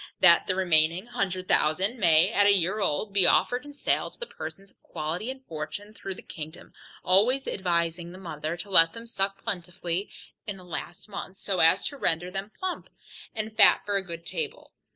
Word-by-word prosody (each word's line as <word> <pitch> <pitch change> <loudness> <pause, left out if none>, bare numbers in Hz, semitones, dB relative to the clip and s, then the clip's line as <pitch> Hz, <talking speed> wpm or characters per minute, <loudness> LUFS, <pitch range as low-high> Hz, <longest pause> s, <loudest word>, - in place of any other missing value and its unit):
That 170 -2 +6
the 185 - +1
remaining 170 0 +2
hundred 195 -7 -3
thousand 190 +11 +2
may, 165 -5 +5
at 205 0 +4
a 205 - +6
year 190 +3 0
old, 200 +2 -1
be 190 -3 +5
offered 245 +3 +3
in 290 - -10
sale 285 - 0
to - - -20
the 480 - -4
persons 195 - -9
of - - -38
quality 165 +9 -4
and 265 0 -8
fortune, 165 +7 -6
through 195 -3 -6
the - - -11
kingdom, 160 +1 -9 0.3
always 225 +9 +3
advising 170 -2 -1
the 185 - -11
mother 160 -2 -5
to 200 +3 -8
let 165 -3 +6
them 230 0 -9
suck 195 -3 -2
plentifully 180 -2 -3 0.4
in 205 -2 -4
the 185 - -14
last 175 +2 -7
month, 195 -2 -7
so 195 -2 -2
as 165 +4 +5
to 285 - -11
render 175 -6 0
them 195 +2 -5
plump, 370 -1 -4 0.5
and 220 0 -4
fat - - +6
for 205 0 -1
a 195 - +2
good 170 -2 -8
table. 475 0 -5
190 Hz, 195 wpm, -27 LUFS, 170-210 Hz, 0.5 s, That